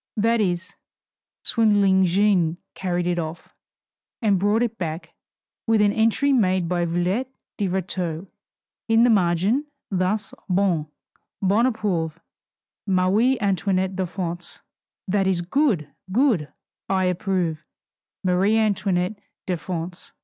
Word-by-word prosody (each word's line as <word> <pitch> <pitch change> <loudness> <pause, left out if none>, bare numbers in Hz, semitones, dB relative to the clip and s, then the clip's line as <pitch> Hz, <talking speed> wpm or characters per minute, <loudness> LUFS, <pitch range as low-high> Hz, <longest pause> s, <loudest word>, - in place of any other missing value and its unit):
That 225 +2 +2
is, 180 -2 -1 0.7
swindling 205 -5 +3
Jeanne 180 -3 +2 0.2
carried 180 -2 -2
it 175 0 0
off, 160 0 -6 0.7
and 205 -5 +2
brought 205 +4 +2
it 230 -1 -3
back, 165 -1 -4 0.6
with 225 -1 +3
an 205 -1 +4
entry 225 +6 +2
made 185 -7 +2
by 175 0 0
Villette 180 +9 -1 0.3
de 205 - 0
Rétaux 180 -2 -3 0.6
in 225 0 +4
the 245 - +5
margin, 195 - +2 0.2
thus: 195 +2 -1 0.2
"Bon, 180 -5 +1 0.5
bon 215 +6 +3
Approuvé, 180 -8 -1 0.7
Marie 195 +7 +3
Antoinette 190 -1 0
de 190 -1 -1
France." 175 -1 -5 0.5
That 195 0 +1
is, 185 -2 +1
"Good, 190 - +1 0.2
good 210 - +2 0.4
I 190 -1 +2
approve. 180 -3 -1 0.6
Marie 190 +4 +2
Antoinette 200 -2 0 0.2
de 185 - 0
France." 175 +1 -6
190 Hz, 120 wpm, -23 LUFS, 175-210 Hz, 0.7 s, the